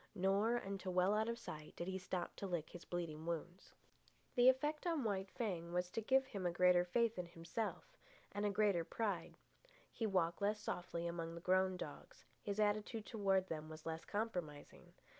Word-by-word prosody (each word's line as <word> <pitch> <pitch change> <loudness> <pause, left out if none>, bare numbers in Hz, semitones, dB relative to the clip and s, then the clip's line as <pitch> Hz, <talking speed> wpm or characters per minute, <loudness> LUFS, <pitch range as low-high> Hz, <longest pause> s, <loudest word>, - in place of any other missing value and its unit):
Nor, 200 +5 +3
until 195 -4 -3
well 185 +2 +4
out 220 +2 +2
of 235 - -1
sight, 155 -9 -8
did 170 - -4
he 190 0 -2
stop 180 -1 -3
to 200 - -3
lick 175 -4 -2
his 175 - -9
bleeding 165 -2 -4
wounds. 170 +2 -4 0.6
The 245 0 +7
effect 295 +5 +1
on 325 -5 +1
White 195 -3 -1
Fang 175 -8 -3
was 180 0 0
to 225 - -1
give 265 +4 +4
him 205 -7 -5
a - - +1
greater 180 0 +5
faith 230 +3 +1
in 175 - -3
himself, 170 +6 -3 0.5
and 205 +1 -2
a 205 - +3
greater 200 -4 +3
pride. 205 +5 -2 0.5
He 225 - -1
walked 180 -2 +1
less 210 +1 +2
softly 175 -4 -3
among 165 -1 -3
the - - -5
grown 185 +1 +3
dogs; - - -8 0.2
his 205 0 -3
attitude 210 +1 +1
toward 195 -4 +2
them 155 -2 -4
was 155 0 -9
less 160 0 -3
compromising. 165 - -4
190 Hz, 185 wpm, -40 LUFS, 170-215 Hz, 0.6 s, The